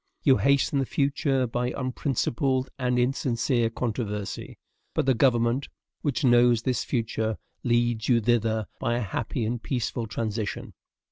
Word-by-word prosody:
You 135 -3 +5
hasten 140 0 +2
the 135 - 0
future 140 -2 +1
by 125 +1 -1
unprincipled 130 0 -1
and 125 -1 +1
insincere 125 -1 +1
controversy; 110 -4 -4 0.4
but - - +1
the 135 - +4
government, 120 +1 +2 0.3
which 145 0 -1
knows 120 -2 +5
this 125 0 0
future, 110 -3 -1 0.3
leads 120 -1 +1
you 120 -2 +5
thither 110 -1 +1
by 120 - 0
a 120 - -1
happy 110 +4 -2
and 115 +1 -2
peaceful 120 -2 -2
transition. 110 -1 -3
120 Hz, 135 wpm, -26 LUFS, 115-130 Hz, 0.4 s, You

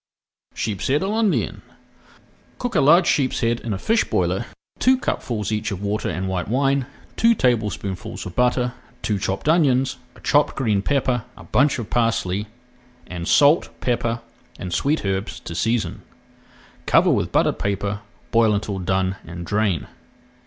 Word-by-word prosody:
SHEEP 105 -3 -2
SHEAD 145 +6 +1
À 195 - -1
L'INDIENNE 220 -2 0 1.0
Cook 245 0 -3
a - - +3
large 170 +6 +6
sheepshead 120 -6 +1
in 115 - -5
a 100 - -1
fish 225 - +2
boiler - - 0
with - - -20 0.3
two 260 +1 +4
cupfuls 110 - -2
each 105 0 -1
of 100 0 -5
water 105 +1 -1
and 95 +1 -3
white 90 -2 -2
wine, 135 +3 +1 0.3
two 230 0 +4
tablespoonfuls 110 - -1
of 90 - -8
butter, 125 0 +2 0.3
two 105 -2 0
chopped 95 +6 -3
onions, 135 -5 +3 0.2
a - - -16
chopped 145 0 +2
green 110 -7 +1
pepper, 130 -1 0
a - - -11
bunch 145 +1 +2
of 115 -4 -6
parsley, 105 -4 0 0.6
and 85 -1 -6
salt, 145 +3 +5
pepper, 120 -1 -1 0.4
and 90 - -5
sweet 145 - 0
herbs 95 +1 -2
to - - -7
season. 115 +6 -1 0.9
Cover - - +5
with - - 0
buttered - - +2
paper, 100 0 -2 0.3
boil 115 -2 +4
until 100 -1 -3
done 95 +1 0
and 85 +1 -8
drain. 100 -6 0
115 Hz, 155 wpm, -22 LUFS, 100-135 Hz, 1.0 s, large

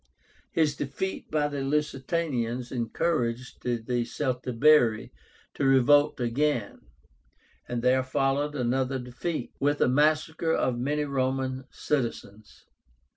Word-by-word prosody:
His 155 -3 +2
defeat 145 +8 -4
by 150 -1 +1
the 145 -1 -4
Lusitanians 135 -4 -1
encouraged 125 0 -2
the 120 -1 -1
Celtibéri 125 +1 +1 0.4
to - - -3
revolt 140 +3 +4
again, 120 -2 -1 0.9
and 120 -1 -3
there 130 +1 +4
followed 140 +2 0
another 130 +1 0
defeat, 125 +3 -5
with 145 +1 +1
a - - +4
massacre 155 +4 +2
of 125 -2 0
many 145 +4 0
Roman 130 -1 -1
citizens. 115 -6 -4
135 Hz, 105 wpm, -27 LUFS, 125-150 Hz, 0.9 s, revolt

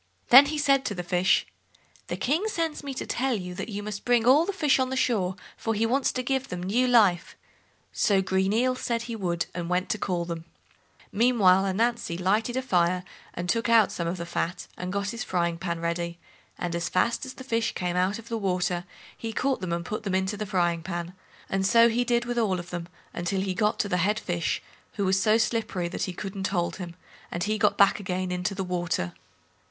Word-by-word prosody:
Then 270 +3 +10
he 305 +1 -2
said 275 -2 +3
to 205 - -2
the 180 - -4
fish, 180 +2 +2 0.6
"The - - -3
King 320 - 0
sends 330 -8 -2
me 275 -2 -5
to - - -4
tell 260 0 0
you 180 -3 -5
that 180 - -5
you 205 -1 -4
must 205 -1 -5
bring 240 -2 +3
all 290 +7 +5
the - - +1
fish 300 -8 +2
on 260 0 0
shore, 205 -8 +1 0.2
for 225 -1 -2
he 220 +2 +1
wants 260 +4 +1
to 255 - -2
give 265 +1 -1
them 180 -7 -5
new 235 +7 +2
life." 210 -8 +3 0.6
So 200 -2 +3
"Green 190 0 +1
Eel" 250 +4 +2
said 235 -2 -2
he 235 -1 -5
would, 175 -5 -1
and 175 -1 -4
went 180 +1 0
to 215 - -1
call 175 -3 -1
them. 165 -1 -5 0.7
Meanwhile 200 -4 +4
Ananzi 220 -2 0
lighted 215 +7 +1
a 260 - -1
fire, 180 -5 +2 0.3
and 175 - -4
took 230 +6 0
out 225 -3 +5
some 170 - -3
of 175 +2 -2
the 170 - -5
fat, 175 +1 -3
and 180 0 -5
got 200 0 -1
his 235 - -4
frying 170 -2 -1
pan 170 -2 -3
ready, 170 0 -2 0.4
and 175 -1 -3
as 170 0 -2
fast 230 +6 +1
as 260 - -7
the 260 - -9
fish 230 -3 0
came 180 -1 -2
out 185 +3 +1
of 230 0 -11
the 230 -1 -3
water 180 -2 -1 0.3
he 225 - -5
caught 265 +4 0
them 185 -2 -3
and 170 0 -2
put 215 +4 -4
them 195 -3 -2
into 190 +2 0
the 210 0 -4
frying 175 -4 +1
pan, 175 0 -5 0.3
and 195 0 -1
so 230 +4 +6
he 240 +2 +1
did 240 0 +1
with 240 0 -1
all 200 -5 +1
of 175 - -9
them 175 -1 -4 0.3
until 185 +2 -1
he 190 -1 -1
got 210 +3 +1
to - - 0
the 180 - 0
Head 205 +5 +1
fish, 175 -2 -2 0.3
who 200 - -1
was 190 +1 +2
so 215 +2 +4
slippery 220 -6 -1
that - - -3
he 185 - -4
couldn't 195 +1 -4
hold 175 -3 -1
him, 175 -3 -7 0.3
and 175 - -3
he 215 +1 -1
got 210 0 +3
back 200 +1 +5
again 185 -1 -3
into 180 +2 -2
the 190 - -2
water. 175 - -2
195 Hz, 225 wpm, -27 LUFS, 180-235 Hz, 0.7 s, Then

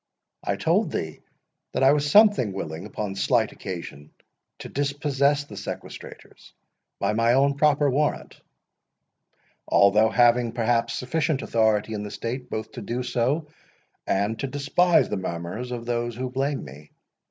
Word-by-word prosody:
—"I - - -1
told - - +1
thee - - -4 0.5
that - - 0
I 135 - +7
was 145 0 +1
something 205 - +6
unwilling, 95 -2 -5
upon 105 -1 -4
slight 110 +2 +1
occasion, 85 -6 -8 0.5
to - - -8
dispossess 145 0 0
the 145 - -14
sequestrators - - -9 0.5
by - - 0
my 115 +2 +3
own 140 +2 +3
proper 145 0 +3
warrant, 145 +2 -1 1.3
although 105 +3 +5
having, 120 0 +3
perhaps, 115 0 0
sufficient 155 +3 -1
authority 110 -1 +1
in 105 - -3
the 105 - -5
state 115 +5 -5
both 110 0 -5
to - - -8
do 120 +5 -3
so, 125 +6 0 0.6
and 100 +3 0
to 135 - -2
despise 145 +6 +2
the - - -3
murmurs 90 +7 -5
of 120 -1 -5
those 120 -1 -2
who 125 +1 -4
blame 135 - -2
me. 75 +2 -13
120 Hz, 145 wpm, -25 LUFS, 105-140 Hz, 1.3 s, I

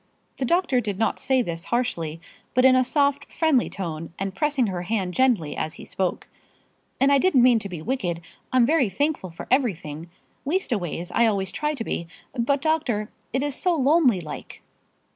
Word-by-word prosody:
The 265 - -1
doctor 335 -4 +2
did 205 -4 -3
not 220 0 0
say 260 -2 +2
this 170 -2 -4
harshly, 170 -10 -1 0.4
but 255 +1 +4
in 260 0 +7
a 255 - +4
soft, 285 +2 +1
friendly 310 -7 +2
tone, 165 -4 -5
and 195 0 -3
pressing 280 +4 +1
her 185 -4 -3
hand 185 -1 -2
gently 230 - +2
as 155 - -3
he - - -10
spoke. 185 -2 -2 0.7
"And 275 +1 +4
I 280 - +5
didn't 275 -7 +4
mean 245 -2 +5
to 205 -2 -6
be 170 -4 -7
wicked. 185 -9 -2 0.3
I'm 255 -2 +5
very 280 -4 +3
thankful 285 -1 -1
for 165 - -9
everything 170 - 0 0.3
leastways, 225 - -2
I 235 - +3
always 195 -3 0
try 300 +8 -1
to 240 - -4
be. 170 -6 -3 0.3
But, 270 +3 0
doctor, 265 -10 0 0.2
it 265 +2 0
is 290 -1 -1
so 355 +5 +1
lonely 280 - +4
like." 155 -3 -8
240 Hz, 180 wpm, -24 LUFS, 185-275 Hz, 0.7 s, in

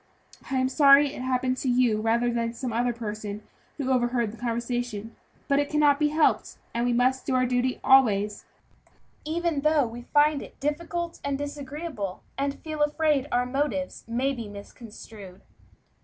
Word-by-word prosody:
I 270 - -2
am 260 0 +2
sorry 280 +1 +6
it - - -7
happened 255 0 0
to 265 - -3
be 245 - +2
you 235 -4 +2
rather 235 +2 +1
than 230 0 -2
some 245 -1 -4
other 240 +2 +1
person 215 -2 -6 0.3
who 270 -3 -1
overheard 240 -3 +1
the - - -9
conversation; 235 -2 -3 0.3
but 280 0 +3
it 290 - 0
cannot 295 -1 +3
be 300 - +3
helped, 305 +1 +1 0.2
and 235 +1 0
we - - +2
must 255 +2 +1
do 265 - +1
our 255 0 +3
duty 250 +1 0
always, 210 -6 +4 0.8
even 325 -1 -1
though 305 -2 +3
we 235 +1 -7
find 295 -1 +4
it - - -12
difficult 335 +4 -3
and 280 -1 -1
disagreeable, 285 - -5
and 280 0 -2
feel 310 -1 -4
afraid 295 -2 +2
that 295 - -9
our 245 0 +2
motives 275 +2 -2
may 255 +4 0
be 235 -4 -6
misconstrued." 205 -2 -11
255 Hz, 170 wpm, -26 LUFS, 235-290 Hz, 0.8 s, sorry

